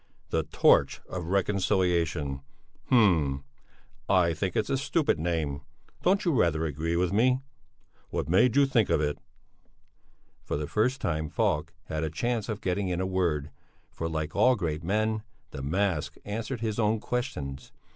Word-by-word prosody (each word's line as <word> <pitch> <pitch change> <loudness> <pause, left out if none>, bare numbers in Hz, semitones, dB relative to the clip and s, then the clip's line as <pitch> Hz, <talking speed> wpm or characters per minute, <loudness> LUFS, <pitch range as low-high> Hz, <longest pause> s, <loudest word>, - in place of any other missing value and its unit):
"The - - +2
Torch - - +3
of 90 -2 -5
Reconciliation! 90 -7 +1 0.5
Hm! 80 - +3 0.7
I 90 -3 +4
think 90 +3 -2
it's 105 - 0
a 135 - +2
stupid 140 - +1
name! 80 -4 -1 0.4
Don't 195 +2 +2
you 170 - +3
rather 85 - +2
agree 80 +3 -2
with 90 +2 +1
me? 125 +5 +3 0.7
What - - -2
made 110 +8 +4
you 140 0 +6
think 120 -6 +2
of - - +3
it?" 75 -1 -1 1.2
For - - -2
the 75 - -2
first 125 - 0
time 80 -2 -1
Falk - - 0
had 80 0 -3
a 80 - -1
chance 115 +7 -2
of 105 -2 -3
getting 95 +1 -1
in 90 -1 -1
a 95 - 0
word, 85 -6 0 0.4
for 80 - -4
like 80 -1 -3
all 125 0 +5
great 80 -6 -3
men, 110 +4 0 0.3
the 70 - -6
mask 85 +2 -1
answered 115 +4 -4
his 110 -1 -2
own 110 0 +2
questions. 75 - -4
90 Hz, 155 wpm, -28 LUFS, 80-110 Hz, 1.2 s, you